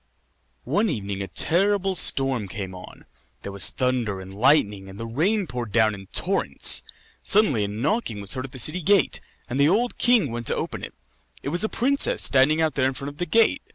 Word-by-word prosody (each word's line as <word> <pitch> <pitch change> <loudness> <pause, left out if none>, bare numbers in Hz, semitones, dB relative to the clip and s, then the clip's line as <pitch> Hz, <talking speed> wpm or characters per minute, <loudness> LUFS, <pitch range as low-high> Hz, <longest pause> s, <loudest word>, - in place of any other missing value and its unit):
One 210 +2 0
evening 100 - -4
a 100 - -4
terrible 195 - +1
storm 135 - +1
came 95 -2 -7
on; 90 - -13 0.4
there 100 - -6
was 100 0 +2
thunder 125 -6 -2
and 95 0 -10
lightning, 105 -5 +1
and 95 - -12
the 115 - -5
rain 180 - 0
poured 120 -6 -6
down 110 -1 +2
in 95 -1 -11
torrents. - - +2 0.4
Suddenly 170 - +2
a - - -4
knocking 115 - -2
was 100 -1 +1
heard 130 -1 -4
at 135 - -10
the 130 - -10
city 155 +9 +2
gate, 195 +1 +2 0.3
and 130 +2 -4
the 145 +2 +4
old 235 +7 0
king 235 - +3
went 120 0 -6
to - - -1
open - - -5
it. - - -8 0.5
It - - -3
was 175 +6 +1
a 220 - -1
princess 275 +4 +2
standing 140 +4 +4
out 160 -1 +1
there 130 -2 +1
in 135 - -3
front 140 +2 -6
of 145 - -14
the 175 - -2
gate. 230 - +2
135 Hz, 210 wpm, -23 LUFS, -, 0.5 s, the